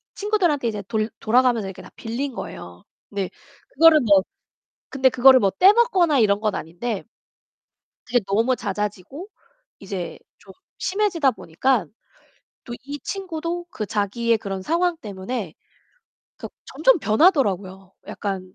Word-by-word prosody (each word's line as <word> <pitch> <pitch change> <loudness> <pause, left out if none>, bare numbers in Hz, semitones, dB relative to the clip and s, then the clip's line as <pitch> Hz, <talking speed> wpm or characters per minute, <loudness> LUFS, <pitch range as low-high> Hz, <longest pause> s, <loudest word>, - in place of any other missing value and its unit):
친구들한테 360 - 0
이제 210 -2 -3
돌 220 -1 -1
돌아가면서 235 -2 +2
이렇게 190 - -9
다 - - -13
빌린 250 +4 -4
거예요. 90 - -9 0.3
근데 200 -3 -3 0.4
그거를 320 +1 +6
뭐 200 -5 +5 0.7
근데 265 -1 +2
그거를 260 +1 +6
뭐 195 - +2
떼먹거나 380 - +4
이런 205 -1 +3
건 215 -2 -1
아닌데 190 +6 -5 1.0
이제 245 - +2
너무 225 +6 +1
잦아지고 210 - -5 0.5
이제 190 -3 -6 0.2
좀 190 -1 -16 0.2
심해지다 370 -8 +1
보니깐 215 - -1 0.7
또 240 - -7
이 290 +1 -6
친구도 350 -3 -4
그 215 - -5
자기의 220 +3 0
그런 195 -3 -5
상황 340 - 0
때문에 200 - -6 0.8
그 - - -8 0.2
점점 - - +2
변하더라고요. 200 - +1
약간 190 -2 -5
235 Hz, 290 characters per minute, -22 LUFS, 200-305 Hz, 1.0 s, 그거를